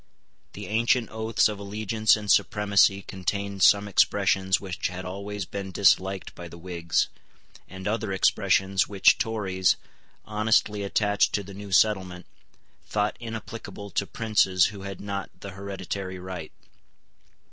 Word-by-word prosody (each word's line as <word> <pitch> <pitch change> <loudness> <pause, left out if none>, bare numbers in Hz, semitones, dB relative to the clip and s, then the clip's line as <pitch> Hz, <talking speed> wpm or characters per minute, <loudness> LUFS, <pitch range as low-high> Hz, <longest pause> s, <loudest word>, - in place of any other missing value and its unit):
The - - -7
ancient 115 +2 +1
oaths 110 +1 +1
of 105 -2 -5
allegiance 110 +2 +1
and 105 -2 -1
supremacy 100 -2 +3
contained 100 +1 -4
some 100 +2 +5
expressions 95 -1 +2
which 95 -2 -3
had 90 0 -7
always 100 +1 -5
been 100 +2 -6
disliked 95 0 +2
by 85 - -9
the 85 - -12
Whigs, 85 -1 -1 0.6
and 95 0 -7
other 110 -1 -1
expressions 95 0 +2
which 100 -2 +4
Tories, 95 -5 +1 0.5
honestly 105 -1 +1
attached 100 +1 +1
to 100 - 0
the 100 +1 -11
new 100 0 -9
settlement, 95 -3 +2 0.6
thought 105 0 0
inapplicable 115 -3 -7
to 100 - -1
princes 105 -7 +2
who 100 - -9
had 100 -1 -7
not 100 -1 -5
the 100 - -8
hereditary 95 -1 -6
right. 90 -3 -7
100 Hz, 135 wpm, -26 LUFS, 95-105 Hz, 0.6 s, some